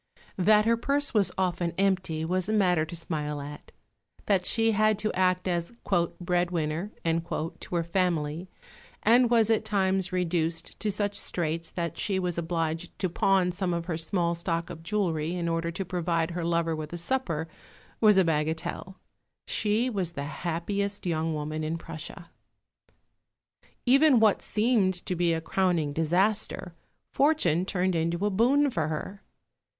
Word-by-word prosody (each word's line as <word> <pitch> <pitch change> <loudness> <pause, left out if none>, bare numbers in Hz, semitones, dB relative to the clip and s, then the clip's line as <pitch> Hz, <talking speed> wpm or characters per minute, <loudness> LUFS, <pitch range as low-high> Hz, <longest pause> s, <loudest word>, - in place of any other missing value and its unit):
That 210 +3 +5
her 230 0 +3
purse 280 +4 0
was 200 -5 +3
often 175 -2 0
empty 185 -5 0
was 185 +3 -1
a - - +1
matter 180 -6 +3
to 165 - -8
smile 150 -3 -3
at; 145 +1 -9 0.5
that 190 -3 +2
she 225 -1 +2
had 215 0 +3
to 215 +1 -2
act 185 0 +1
as 175 +5 -2 0.4
"breadwinner" 175 0 -1
to 165 +1 -3
her 170 - +1
family, 170 -1 -1 0.5
and 240 +2 +5
was 230 -2 +4
at 220 - +2
times 190 -3 0
reduced 170 -2 -1
to 215 - -1
such 205 0 -1
straits 165 -3 -2
that 170 -3 -4
she 195 -2 0
was 180 -2 -1
obliged 165 0 -3
to 185 - -1
pawn 185 +1 +2
some 180 -1 -1
of 170 0 -3
her 170 -2 -2
small 170 +1 0
stock 170 0 -2
of 165 -2 -9
jewellery 170 -3 -1
in 170 -1 -2
order 165 0 -1
to 185 +3 -4
provide 170 -2 -1
her 170 0 -3
lover 165 -1 0
with 155 -1 -6
a - - -3
supper, 170 -5 -2 0.5
was 210 -3 +6
a 190 - +6
bagatelle. 160 +3 -2 0.5
She 215 +4 +1
was 190 -8 -2
the 140 - -4
happiest 180 +7 -3
young 160 -2 0
woman 155 +1 -3
in 160 +2 -2
Prussia. 165 +2 -9 1.5
Even 270 0 +6
what 215 -2 +4
seemed 210 -4 +2
to 180 - -1
be 175 -1 +2
a 165 0 0
crowning 170 -4 0
disaster, 180 +3 0 0.4
fortune 230 - +2
turned 185 -1 0
into 170 +3 0
a 210 - +1
boon 265 +8 +3
for 160 -8 -1
her. 175 +6 -5
175 Hz, 155 wpm, -27 LUFS, 165-200 Hz, 1.5 s, was